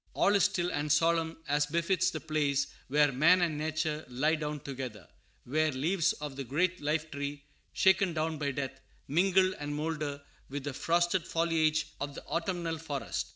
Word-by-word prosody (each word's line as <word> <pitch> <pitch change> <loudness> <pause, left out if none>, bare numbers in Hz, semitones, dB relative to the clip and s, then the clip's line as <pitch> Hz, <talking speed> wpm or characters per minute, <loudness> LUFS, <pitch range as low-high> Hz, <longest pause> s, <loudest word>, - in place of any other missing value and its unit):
All 200 - +3
is 200 - +5
still 180 -3 0
and 145 +1 -1
solemn, 165 +1 +2
as 145 0 +2
befits 170 +3 +1
the 160 - -4
place 145 -3 +1 0.2
where 145 +1 +4
man 160 +8 +5
and 165 -3 0
nature 155 0 -2
lie 140 +6 +1
down 150 -2 -3
together; 125 - -6 0.4
where 155 +4 +1
leaves 160 +6 +1
of 150 -2 -7
the 135 - -4
great 170 +8 0
lifetree, 145 -2 -2 0.3
shaken 190 -1 +4
down 160 -1 -2
by 145 -2 0
death, 135 -1 -4 0.3
mingle 185 +4 +3
and 145 0 -4
moulder 150 -2 -3 0.3
with 140 0 -4
the 145 -1 -4
frosted 175 +4 +1
foliage 160 -2 +2 0.2
of 145 -1 -4
the - - -8
autumnal 170 -1 -2
forest. 145 -4 -3
155 Hz, 165 wpm, -31 LUFS, 145-170 Hz, 0.4 s, is